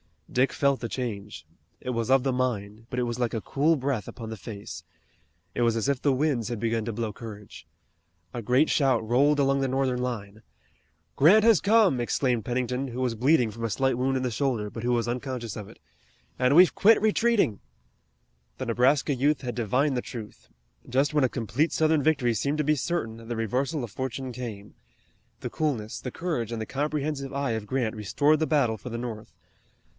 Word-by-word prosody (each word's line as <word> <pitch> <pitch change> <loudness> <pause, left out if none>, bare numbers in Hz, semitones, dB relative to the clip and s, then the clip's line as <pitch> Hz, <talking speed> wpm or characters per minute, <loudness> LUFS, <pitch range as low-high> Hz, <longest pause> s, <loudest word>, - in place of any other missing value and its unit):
Dick 130 +2 +2
felt 140 -1 +2
the 120 - -3
change. 105 -9 -5 0.4
It - - -5
was 115 -1 -2
of 135 -1 +4
the 135 - +1
mind, 115 -4 -2
but 125 - -5
it 125 - +1
was 120 0 -3
like 120 -2 0
a 110 - -2
cool 150 +8 +2
breath 135 -6 -2
upon 115 -2 -8
the 110 - -6
face. 100 -5 -8 0.7
It - - -2
was 115 -1 +3
as 115 +4 0
if 140 -3 0
the 140 - +3
winds 130 -4 0
had 120 -2 -4
begun 115 0 -1
to 115 - -3
blow 115 0 -3
courage. 105 -2 -10 0.7
A 120 - -4
great 125 +7 +3
shout 130 -6 +2
rolled 140 +5 +3
along 135 0 +3
the 135 - +1
Northern 130 -1 0
line. 110 -4 -5 0.8
"Grant 195 +10 +6
has 225 -6 +6
come!" 205 - +4
exclaimed 120 -2 0
Pennington, 125 +2 -1
who 125 0 -5
was 125 -2 0
bleeding 125 0 +3
from 115 +2 -5
a - - -1
slight 130 +2 +1
wound 130 +1 0
in 130 - -2
the 125 - -1
shoulder, 115 -4 -1
but 115 - -7
who 120 0 +1
was 120 -1 0
unconscious 125 -2 -4
of 105 -2 -7
it. - - -16 0.6
"And 125 +2 +3
we've 180 +1 +7
quit 225 +2 +5
retreating!" 220 - +2 1.0
The 130 - -4
Nebraska 130 +5 +2
youth 140 +3 +1
had 125 -2 -4
divined 125 +5 +1
the - - 0
truth. 110 -4 -9 0.4
Just 135 +4 +1
when 150 -3 +3
a - - +1
complete 130 +7 -1
Southern 155 -1 +3
victory 135 -5 +2
seemed 140 +7 -1
to 150 - +1
be 150 +1 +2
certain 115 -7 -3
the 120 - -3
reversal 130 +6 -1
of 115 - -6
fortune 130 +1 -4
came. 110 -5 -7 0.7
The - - -4
coolness, 125 -9 -2
the 125 - -5
courage, 125 -7 -3
and 115 - -3
the - - -3
comprehensive 145 0 -2
eye 140 -2 -1
of 110 -2 -3
Grant 120 -3 -1
restored 145 +9 +2
the 155 - +1
battle 130 -8 +2
for 115 - -8
the 115 - -4
North. 115 -3 -6
125 Hz, 200 wpm, -27 LUFS, 115-140 Hz, 1.0 s, we've